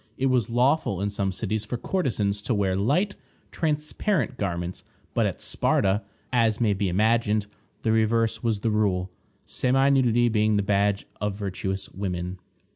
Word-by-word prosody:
It 135 Hz, 0 st, +1 dB
was 125 Hz, -2 st, +1 dB
lawful 125 Hz, -, +2 dB
in 100 Hz, +1 st, -1 dB
some 100 Hz, -1 st, -1 dB
cities 105 Hz, +2 st, -2 dB
for 115 Hz, +3 st, -4 dB
courtesans 110 Hz, -, -1 dB
to 115 Hz, +2 st, -1 dB
wear 95 Hz, -2 st, +1 dB
light, 145 Hz, -, +1 dB, 0.4 s
transparent 155 Hz, +3 st, 0 dB
garments; 90 Hz, -4 st, -3 dB, 0.3 s
but -, -, +2 dB
at -, -, -5 dB
Sparta, 100 Hz, +2 st, +2 dB, 0.3 s
as 115 Hz, -3 st, +3 dB
may 110 Hz, -4 st, +3 dB
be 100 Hz, -1 st, -1 dB
imagined, 110 Hz, +2 st, +2 dB, 0.4 s
the 110 Hz, -, +2 dB
reverse 110 Hz, 0 st, +2 dB
was 110 Hz, -3 st, 0 dB
the 115 Hz, -, +1 dB
rule, 95 Hz, -4 st, +1 dB, 0.3 s
semi 135 Hz, +2 st, +2 dB
nudity 120 Hz, -3 st, +3 dB
being 110 Hz, -1 st, +2 dB
the 100 Hz, -, +2 dB
badge 100 Hz, 0 st, +1 dB, 0.2 s
of 105 Hz, -1 st, -1 dB
virtuous 95 Hz, -1 st, -3 dB
women. 90 Hz, -1 st, -4 dB
110 Hz, 155 wpm, -25 LUFS, 100-120 Hz, 0.4 s, as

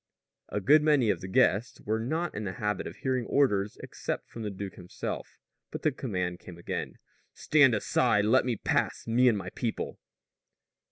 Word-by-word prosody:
A -, -, -2 dB
good 145 Hz, +9 st, +5 dB
many 145 Hz, -8 st, +4 dB
of 90 Hz, -, -3 dB
the 95 Hz, -, -6 dB
guests 100 Hz, +4 st, +2 dB
were 110 Hz, +1 st, -1 dB
not 160 Hz, +9 st, -2 dB
in 105 Hz, -, -4 dB
the 95 Hz, -2 st, -3 dB
habit 105 Hz, -3 st, -2 dB
of -, -, -8 dB
hearing 130 Hz, -3 st, -1 dB
orders 105 Hz, -8 st, +2 dB
except -, -, -5 dB
from 115 Hz, -, -9 dB
the 105 Hz, -, -3 dB
duke 100 Hz, 0 st, -6 dB
himself; 90 Hz, -1 st, -6 dB, 0.3 s
but -, -, -7 dB
the 155 Hz, -, +3 dB
command 90 Hz, -9 st, -3 dB
came 90 Hz, -2 st, -11 dB
again: 85 Hz, -, -4 dB, 0.4 s
"Stand 145 Hz, -6 st, +4 dB
aside! 105 Hz, 0 st, +2 dB
Let 125 Hz, +5 st, +4 dB
me 125 Hz, -2 st, -1 dB
pass -, -, -1 dB
me 125 Hz, +3 st, +3 dB
and 115 Hz, -4 st, +4 dB
my 100 Hz, -, -6 dB
people!" 115 Hz, -3 st, -4 dB
110 Hz, 180 wpm, -29 LUFS, 100-130 Hz, 0.4 s, good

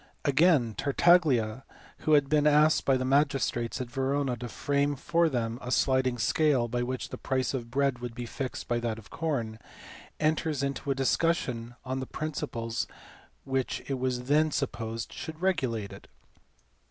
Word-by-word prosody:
Again, 140 Hz, -5 st, +4 dB
Tartaglia, 135 Hz, -7 st, +3 dB, 0.4 s
who 155 Hz, -, +1 dB
had 145 Hz, -2 st, +5 dB
been 150 Hz, 0 st, +3 dB
asked 150 Hz, +1 st, +4 dB
by 135 Hz, -1 st, +4 dB
the 130 Hz, -, -2 dB
magistrates 135 Hz, -4 st, +1 dB
at 125 Hz, -2 st, -5 dB
Verona 135 Hz, -1 st, 0 dB
to 120 Hz, 0 st, -6 dB
frame 145 Hz, +2 st, 0 dB
for 165 Hz, +4 st, +2 dB
them 120 Hz, -3 st, -2 dB
a 125 Hz, -, -6 dB
sliding 130 Hz, -1 st, +2 dB
scale 130 Hz, +2 st, +2 dB
by 120 Hz, +1 st, -2 dB
which 130 Hz, +1 st, -3 dB
the -, -, -7 dB
price 130 Hz, -1 st, -1 dB
of 120 Hz, -3 st, -4 dB
bread 135 Hz, 0 st, +1 dB
would 120 Hz, -1 st, -6 dB
be 120 Hz, 0 st, -5 dB
fixed 130 Hz, +2 st, -5 dB
by 120 Hz, -1 st, 0 dB
that 115 Hz, -2 st, -2 dB
of 110 Hz, -, -13 dB
com, 120 Hz, -9 st, -2 dB, 0.6 s
enters 155 Hz, -2 st, 0 dB
into 140 Hz, 0 st, -3 dB
a 135 Hz, -, +2 dB
discussion 130 Hz, -4 st, 0 dB
on 130 Hz, +1 st, -2 dB
the 130 Hz, -, -5 dB
principles 115 Hz, -7 st, -3 dB, 0.6 s
which 135 Hz, -1 st, -2 dB
it 135 Hz, -2 st, -2 dB
was 125 Hz, -1 st, -1 dB
then 150 Hz, +4 st, +3 dB
supposed 115 Hz, -5 st, -3 dB
should 160 Hz, 0 st, -7 dB
regulate 130 Hz, -, -1 dB
it. -, -, -13 dB
130 Hz, 165 wpm, -29 LUFS, 120-145 Hz, 0.6 s, had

